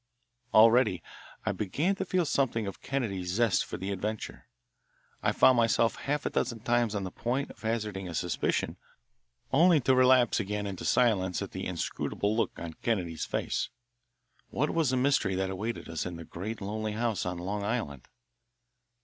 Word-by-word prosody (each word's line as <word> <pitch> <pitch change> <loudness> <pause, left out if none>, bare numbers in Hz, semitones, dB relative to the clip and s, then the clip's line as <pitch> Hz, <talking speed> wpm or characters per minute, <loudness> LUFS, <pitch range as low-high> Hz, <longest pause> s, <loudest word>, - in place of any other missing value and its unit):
Already 110 -5 +5 0.4
I - - +1
began 145 - 0
to 190 - -2
feel 180 -1 +1
something 125 -6 0
of 100 - -6
Kennedy's 100 -10 -2
zest 115 -1 +3
for - - -6
the 95 +2 -4
adventure. 105 +3 -4 0.7
I - - +2
found 130 - +5
myself 115 0 +3
half 145 +1 -2
a - - -1
dozen 115 -3 -1
times 120 -2 +1
on 100 - -1
the 95 - -5
point 130 +7 -2
of - - -16
hazarding 105 -4 -2
a 85 - -6
suspicion, 90 +1 -1 0.8
only 165 +3 +6
to 130 - +3
relapse 130 -2 +5
again 105 0 -2
into 100 -2 -5
silence 95 -7 +2
at - - -7
the - - -4
inscrutable 105 +1 -2
look 115 - -1
on 85 -1 -6
Kennedy's 90 -8 -1
face. - - -2 0.8
What 150 +5 0
was 165 -5 +2
the 130 - +1
mystery 125 -7 +2
that 95 0 -1
awaited 110 +5 -4
us 80 +1 -3
in 90 - -6
the 85 0 -8
great 105 +9 -6
lonely 105 +2 -3
house 115 -2 -1
on 90 -1 -3
Long 100 +4 -3
Island? 100 - -3
110 Hz, 170 wpm, -29 LUFS, 95-125 Hz, 0.8 s, only